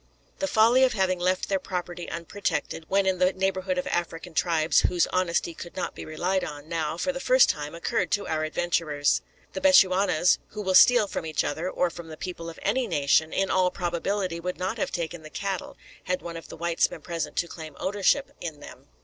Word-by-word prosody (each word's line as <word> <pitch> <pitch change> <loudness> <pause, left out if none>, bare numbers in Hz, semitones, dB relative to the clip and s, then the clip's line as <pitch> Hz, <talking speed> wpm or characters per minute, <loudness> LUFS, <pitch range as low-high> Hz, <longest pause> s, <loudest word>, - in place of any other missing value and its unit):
The 290 - 0
folly 235 +2 +5
of 260 - +4
having 190 -3 +1
left 185 +1 0
their 195 -1 0
property 175 -2 -5
unprotected, 170 -1 -3
when 195 0 +2
in 190 -1 +1
the 185 +1 +3
neighbourhood 190 -1 -1
of 180 - -1
African 170 0 -3
tribes 160 -1 +3
whose 175 -1 +2
honesty 175 -2 0
could 175 +1 -10
not 185 - -3
be - - -8
relied 180 +4 -1
on, 145 0 -7
now, 160 -1 -2
for 275 +10 0
the 270 - -5
first 255 -1 +5
time, 150 +1 -3
occurred 170 +1 -1
to 205 -1 0
our 155 -1 -1
adventurers. 155 -2 0 0.3
The - - -4
Bechuanas, 190 - +5
who 210 0 -5
will 190 -1 0
steal 245 +3 +7
from 200 - -4
each 155 -2 -1
other, 160 +5 -2
or 180 -1 0
from 170 -1 -9
the 155 -1 -9
people 170 -2 -6
of 165 - -10
any 245 +4 +1
nation, 145 +3 +2
in 195 0 0
all 185 -1 +3
probability 180 0 -2
would 180 +1 -4
not 190 +6 -3
have - - 0
taken 170 -1 -4
the 155 - -11
cattle, 195 +2 -4 0.3
had 180 -1 -2
one 170 -1 -6
of 165 - -8
the - - -10
whites 170 0 +1
been - - -10
present 170 -3 -4
to 170 - 0
claim 160 -2 -9
ownership 205 +8 +1
in 160 -4 -5
them. 140 -1 -13
180 Hz, 210 wpm, -26 LUFS, 165-195 Hz, 0.3 s, steal